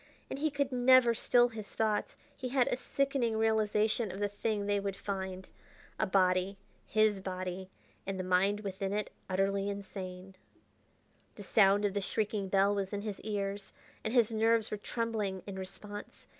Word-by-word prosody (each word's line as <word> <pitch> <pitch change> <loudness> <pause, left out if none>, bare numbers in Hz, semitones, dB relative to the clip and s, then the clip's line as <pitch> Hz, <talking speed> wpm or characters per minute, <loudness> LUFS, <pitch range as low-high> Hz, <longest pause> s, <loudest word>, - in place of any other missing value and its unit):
And - - -3
he 310 +2 +2
could 280 -2 -1
never 250 -1 +6
still 240 +1 +4
his 220 -3 -9
thoughts.... 215 -1 0 0.2
He 255 - -5
had 255 -1 +3
a - - +1
sickening 270 -4 0
realization 220 -1 +2
of 190 - -7
the 205 - +1
thing 205 0 -2
they 205 0 +1
would 200 -1 -3
find. 190 -2 -4 0.5
A - - +2
body! 185 0 +2 0.3
his 215 -2 +3
body! 185 0 -5 0.4
and 195 -1 -3
the - - -1
mind 190 +3 +2
within 195 -1 -3
it 210 0 -2 0.2
utterly 195 +1 +1
insane.... 190 -2 -7 1.0
The 205 - -9
sound 200 0 +4
of 200 - 0
the 200 - -1
shrieking 205 -1 -1
bell 195 +1 +4
was 200 0 -2
in 205 - -2
his 210 -2 -5
ears, 200 -1 -3 0.3
and 220 - -2
his 235 -2 +4
nerves 225 0 +2
were 210 - -2
trembling 210 -3 -2
in 200 - -6
response. 205 +2 -8
205 Hz, 170 wpm, -32 LUFS, 195-220 Hz, 1.0 s, never